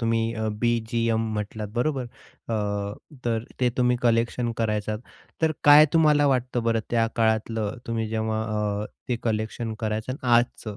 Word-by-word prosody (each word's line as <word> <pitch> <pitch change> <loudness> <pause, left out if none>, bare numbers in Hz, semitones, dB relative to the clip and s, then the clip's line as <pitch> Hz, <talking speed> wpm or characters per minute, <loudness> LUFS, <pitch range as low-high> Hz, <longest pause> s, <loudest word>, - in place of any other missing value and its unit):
तुम्ही 115 -1 +1
अ, 110 -1 -2
बी-जी-एम 115 -1 +1
म्हटलात, 105 0 -4
बरोबर. 135 0 0 0.4
अ, 100 -2 -1 0.3
तर 115 -1 0 0.2
ते 125 - +3
तुम्ही 125 -1 +3
कलेक्शन 120 0 +1
करायचं 105 -1 -1 0.4
तर 160 -1 +3
काय 145 +1 +9
तुम्हाला 150 -3 +4
वाटतं 125 -2 +1
बरं, 115 -1 +1
त्या 115 -1 +3
काळातलं 110 -1 0
तुम्ही 115 -1 -2
जेव्हा 110 0 -1 0.4
अ, - - -6 0.2
ते 125 - +1
कलेक्शन 110 0 -2
करायचं 110 +2 -2
आणि 130 -1 -7
आजचं 115 -3 -1
115 Hz, 145 wpm, -25 LUFS, 110-120 Hz, 0.4 s, काय